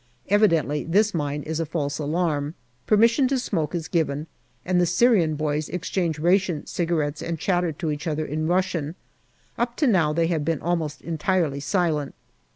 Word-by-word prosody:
Evidently 165 -8 +3
this 205 +5 +2
mine 145 -3 -2
is 160 +1 -3
a - - +1
false 145 -2 -2
alarm. 150 -1 -1 0.3
Permission 230 +5 +4
to 270 +1 +1
smoke 170 - -2
is 165 -2 -3
given, 155 -3 -1 0.4
and 180 0 +2
the 175 - +2
Syrian 180 -4 +3
boys 150 0 -1
exchange 175 -2 -2
ration 175 0 +1
cigarettes 160 -3 -1
and 165 0 -3
chatter 175 0 0
to 160 0 -3
each 150 +3 -4
other 155 0 -1
in 155 +2 -2
Russian. 175 -3 0 0.6
Up 235 0 -1
to 305 - +2
now 180 - +3
they 165 +2 +1
had 165 -3 0
been 160 -1 0
almost 165 -4 -2
entirely 165 -3 0
silent. 155 -2 0
165 Hz, 165 wpm, -24 LUFS, 150-180 Hz, 0.6 s, Permission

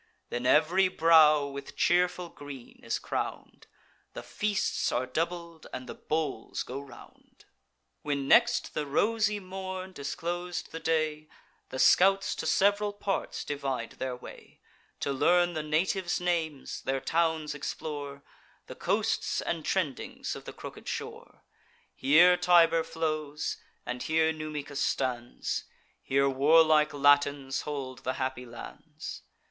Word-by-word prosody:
Then 120 +1 -1
ev'ry 160 +8 +4
brow 160 -4 +5
with 140 0 -8
cheerful 180 0 +2
green 145 -5 -11
is - - -1
crown'd, - - -5 0.5
The - - -7
feasts 210 -2 -1
are 125 +1 0
doubled, 170 +4 -4
and 130 0 -6
the - - -6
bowls 150 -7 -3
go 135 +2 -6
round. 135 -4 -16 0.6
When 140 -2 -2
next 235 - +4
the 150 - -2
rosy 210 +6 +1
morn 190 0 -6
disclos'd 175 +4 -4
the 165 - -5
day, 155 -1 0 0.4
The 130 - -6
scouts 195 +7 +5
to - - -3
sev'ral 205 +1 +2
parts 200 -1 -3
divide 135 -5 -3
their 130 -1 -2
way, 125 - -13 0.4
To 140 - 0
learn 175 +5 +3
the 155 - -2
natives' 175 +4 0
names, 165 -5 -2
their 135 0 -1
towns 160 0 0
explore, 145 -1 -5 0.4
The - - -8
coasts - - 0
and 165 -2 -3
trendings 160 -8 -2
of - - -10
the - - -7
crooked - - -10
shore: - - -7 0.5
Here 165 +7 +6
Tiber 170 -2 +5
flows, 155 -2 -3 0.3
and 125 0 -4
here 160 0 +2
Numicus 150 -2 -5
stands; 125 -2 -2 0.4
Here 140 +1 +2
warlike 155 +3 +5
Latins 145 -1 +3
hold 135 -3 -5
the 130 - -2
happy 130 -1 -3
lands. 60 - -9
155 Hz, 130 wpm, -29 LUFS, 140-175 Hz, 0.6 s, Here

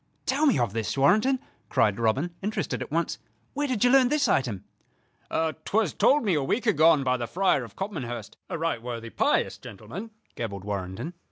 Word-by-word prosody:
"Tell 290 +4 +2
me 275 - +4
of 120 -5 0
this, 115 +3 -2
Warrenton," 215 - +4 0.3
cried 105 -1 +2
Robin, 130 +10 +1
interested 210 +3 -2
at - - -5
once. - - -1 0.3
"Where 290 0 -1
did 250 -5 0
you 245 - +5
learn 265 -2 +6
this 300 0 +2
item?" 115 -8 0 0.7
"'Twas 160 +4 0
told 295 0 +4
to - - -5
me 195 - +2
a 150 - +2
week 220 - -1
agone 160 -8 +5
by 125 -1 +1
the 120 -1 -4
Friar 185 - +2
of - - -11
Copmanhurst, 120 - -5
a - - -3
right 165 -7 -1
worthy, 115 -1 -6
pious - - +1
gentleman," 135 - -8 0.2
gabbled 100 -4 -5
Warrenton. 100 - -4
155 Hz, 185 wpm, -26 LUFS, -, 0.7 s, learn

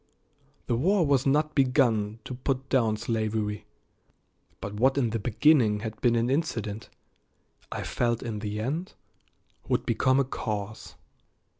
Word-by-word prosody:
The 120 - 0
war 175 - +3
was 140 -2 +2
not 150 +2 +2
begun 120 -6 +2
to - - -5
put 130 +1 -3
down 115 -5 +2
slavery, 110 -2 -2 0.9
but 100 - -6
what 130 +6 +2
in 120 -5 +1
the 115 - -1
beginning 115 -1 +3
had 110 -1 -6
been 120 -2 +3
an 115 +1 +1
incident 115 -7 -2 0.8
I - - -3
felt 120 -1 -1
in 110 -3 -4
the 105 0 -4
end 150 +11 -3 0.7
would - - 0
become 130 +1 +2
a - - +4
cause. 110 -4 -5
120 Hz, 140 wpm, -27 LUFS, 110-135 Hz, 0.9 s, a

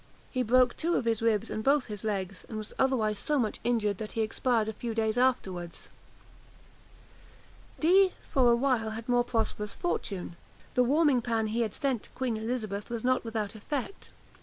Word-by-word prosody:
He 255 - 0
broke 250 +1 +4
two 340 +2 0
of - - 0
his 225 -2 +1
ribs 225 -1 +1
and 215 - -3
both 275 +1 +3
his 210 -3 -7
legs; 195 -3 -3
and 220 - -5
was 215 -1 -7
otherwise 220 -6 +2
so 300 - 0
much 225 -5 -1
injured, 210 -5 +1
that 215 -1 -6
he 225 - 0
expired 225 0 +1
a 220 - -3
few 230 +1 -5
days 220 -1 +1
afterwards. 190 -9 -1 1.9
Dee, 370 +3 +5
for 250 -3 +4
a - - +5
while, 240 -3 +1
had 225 +1 -6
more 245 -1 +3
prosperous 225 -3 -2
fortune. 195 - -3 0.4
The 250 - +4
warming 285 0 +3
pan 225 -2 0
he 220 +2 -1
had 220 -3 -1
sent 270 -6 0
to - - -13
Queen 255 -3 -1
Elizabeth 220 -2 -3
was 235 -2 -4
not 255 0 +2
without 220 -3 -3
effect. 265 - -5
230 Hz, 185 wpm, -29 LUFS, 215-255 Hz, 1.9 s, Dee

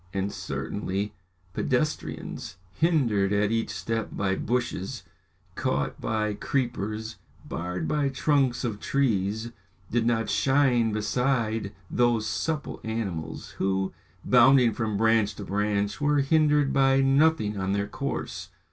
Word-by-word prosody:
And 95 +1 -1
certainly, 100 0 -3 0.4
pedestrians, 90 - -2
hindered 115 - +2
at 105 +1 +2
each 115 0 0
step 115 0 -3
by 95 -1 0
bushes, 120 -5 -2 0.5
caught 70 +1 -2
by 110 -2 0
creepers, 110 -2 -2 0.3
barred 90 +2 -3
by 145 -2 +1
trunks 135 -2 +1
of 110 -5 -2
trees, 110 -4 0 0.4
did 120 0 +1
not 115 -1 +1
shine 130 -5 +3
beside 110 -1 0 0.2
those 120 -3 +2
supple 155 +6 -2
animals, 105 -8 -4
who, 95 0 0 0.3
bounding 125 -1 +6
from 110 -3 -2
branch 110 -1 +3
to 105 - -7
branch, 105 +3 -1
were 145 -1 +3
hindered 150 -1 +3
by 135 0 +4
nothing 135 -5 +3
on 95 0 -1
their 100 0 0
course. - - -4
115 Hz, 120 wpm, -27 LUFS, 100-135 Hz, 0.5 s, bounding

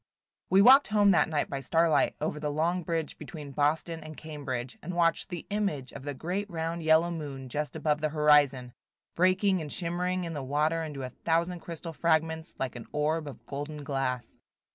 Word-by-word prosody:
WE 195 +1 +6
walked 265 +5 +8
home 205 -1 +4
that 175 - +3
night 150 -2 0
by 140 - -4
starlight, 160 0 +2
over 150 0 -2
the 150 0 -2
long 165 +5 0
bridge 165 -2 -3
between 150 -4 -8
Boston 155 +3 0
and 155 -1 -9
Cambridge, 135 -5 -5
and 175 +3 -5
watched 170 -1 +2
the 175 -3 -6
image 195 -11 -1
of - - -9
the 145 +1 -5
great 185 +8 -3
round 165 0 -3
yellow 160 +2 +4
moon 140 -5 -6
just 150 +5 -3
above 150 -1 0
the 155 - +1
horizon, 145 -5 +3 0.4
breaking 185 +1 +3
and 150 -2 -6
shimmering 180 +1 -1
in 165 -1 -4
the 145 - -4
water 150 +5 0
into 150 -4 -5
a 130 - -4
thousand 170 +5 0
crystal 165 0 -7
fragments, 160 +1 0
like 130 -2 -3
an 120 - -8
orb 150 +1 0
of 140 - -10
golden 145 +1 -6
glass. 135 -3 -2
155 Hz, 185 wpm, -29 LUFS, 145-170 Hz, 0.4 s, walked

